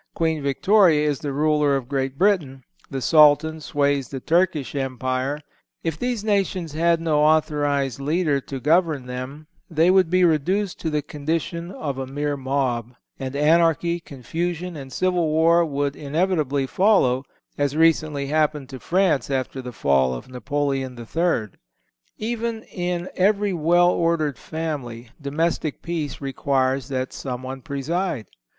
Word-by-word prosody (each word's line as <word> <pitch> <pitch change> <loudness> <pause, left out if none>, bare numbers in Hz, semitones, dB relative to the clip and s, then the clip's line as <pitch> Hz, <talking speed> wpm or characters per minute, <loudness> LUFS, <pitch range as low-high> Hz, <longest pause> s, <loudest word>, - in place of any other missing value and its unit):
Queen 160 -2 0
Victoria 155 +2 +3
is 145 -2 0
the 145 - -4
ruler 150 0 +2
of 130 -3 -3
Great 135 0 -2
Britain. 155 -10 +1 0.3
The 135 -2 -4
Sultan 155 +2 +5
sways 140 -3 0
the 135 - -5
Turkish 165 -2 +1
Empire. 130 +1 -2 0.4
If 165 -2 -2
these 245 -4 -2
nations 195 -6 0
had 165 +1 +2
no 160 -2 +1
authorized 145 -3 +2
leader 150 0 +1
to 135 0 -6
govern 155 -2 +2
them 130 +4 -7 0.2
they 165 +2 +3
would 185 -3 +4
be 185 +1 +3
reduced 180 +5 +1
to 160 - -2
the 150 -1 -1
condition 165 +4 -3
of 145 -7 -4
a 130 - -4
mere 145 +2 -2
mob, 130 -3 -2 0.2
and 135 0 -5
anarchy, 165 +3 +3
confusion 170 +5 -4
and 135 -3 -8
civil 180 -1 +1
war 165 +2 +4
would 145 -2 -1
inevitably 150 -2 0
follow, 135 - +3 0.3
as 145 0 -1
recently 155 -3 +2
happened 150 -2 0
to 130 - -8
France 175 -2 +1
after 130 -1 -2
the 125 -1 -7
fall 65 - +2
of - - -8
Napoleon 135 0 -2
III. 120 -1 -1 0.7
Even 230 0 -3
in 175 -1 -3
every 200 +1 +2
well 175 +2 +4
ordered 160 -7 0
family, 135 -8 -5
domestic 155 +1 -2
peace 160 -5 -3
requires 135 -1 0
that 130 -2 -3
someone 130 0 -5
preside. 145 - -2
150 Hz, 140 wpm, -23 LUFS, 135-170 Hz, 0.7 s, Sultan